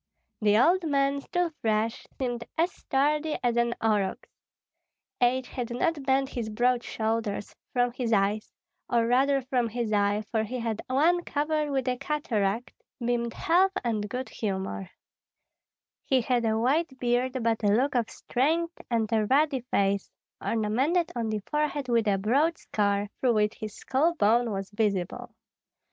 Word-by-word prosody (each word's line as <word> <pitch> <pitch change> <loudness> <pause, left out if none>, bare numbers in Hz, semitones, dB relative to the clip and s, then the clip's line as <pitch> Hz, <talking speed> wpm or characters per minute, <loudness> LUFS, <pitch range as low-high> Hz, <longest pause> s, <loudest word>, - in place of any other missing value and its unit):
The 210 0 +4
old 345 +10 +4
man, 280 0 +1
still 355 +3 -1
fresh, 220 0 0
seemed 245 -3 -2
as 335 +3 +2
sturdy 300 +3 0
as 240 -1 +2
an 235 0 +1
aurochs. 210 -3 0 0.9
Age 250 +1 +2
had 245 -3 -4
not 285 +6 0
bent 265 0 +2
his 235 -5 -4
broad 240 +3 +2
shoulders; 220 -2 -2 0.2
from 245 -1 +2
his 240 -1 -3
eyes 205 0 +1 0.4
or 235 -1 +2
rather 270 +3 +3
from 245 -2 0
his 230 -1 -2
eye, 205 +1 +2
for 220 -2 +1
he 250 +4 -4
had 225 -2 -2
one 325 +7 +3
covered 300 0 -1
with 270 -2 -1
a 250 0 +1
cataract 245 -6 -1 0.3
beamed 235 -1 -1
health 375 +2 +3
and 215 -3 -1
good 255 +4 -4
humor; 190 -2 -3 1.1
he 265 -2 +2
had 240 0 +1
a 220 0 +2
white 265 +4 +1
beard, 250 +1 +1
but 225 -1 +1
a - - +3
look 250 +8 +3
of 240 -3 +1
strength 330 +7 -1
and 230 -2 +1
a 215 -1 +2
ruddy 280 +1 +3
face, 200 0 +1 0.3
ornamented 260 +11 +1
on 230 -2 -1
the 215 -2 -2
forehead 300 -2 -1
with 230 -2 +2
a 200 -1 +3
broad 275 - +2
scar, 205 -1 0
through 245 -3 +2
which 210 0 +2
his 215 -1 -6
skull 310 +6 +1
bone 235 -1 +3
was 195 -1 -4
visible. 210 +3 -2
240 Hz, 155 wpm, -27 LUFS, 215-275 Hz, 1.1 s, The